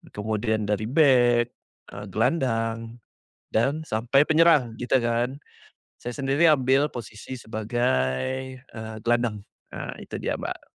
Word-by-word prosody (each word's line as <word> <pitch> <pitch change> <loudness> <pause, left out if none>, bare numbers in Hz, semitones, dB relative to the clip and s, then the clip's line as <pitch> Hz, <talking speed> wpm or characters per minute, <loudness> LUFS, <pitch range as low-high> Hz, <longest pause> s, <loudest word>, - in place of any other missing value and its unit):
kemudian 110 +1 -1
dari 105 +1 0
bek, 125 -5 +4 0.5
eee, 100 - -7
gelandang 115 - 0 0.6
dan 135 +8 +1
sampai 120 +6 +3
penyerang, 155 -8 +4
gitu 125 +2 +2
kan. 120 +3 -1 0.6
Saya 120 - -5
sendiri 140 +4 +3
ambil 135 0 +3
posisi 115 +1 -8
sebagai, 110 - -1
eee, 110 -3 -9
gelandang. 120 -3 +1 0.3
Ah, - - -5
itu - - -7
dia, - - -1
Mbak. - - -6
120 Hz, 115 wpm, -25 LUFS, 110-130 Hz, 0.6 s, bek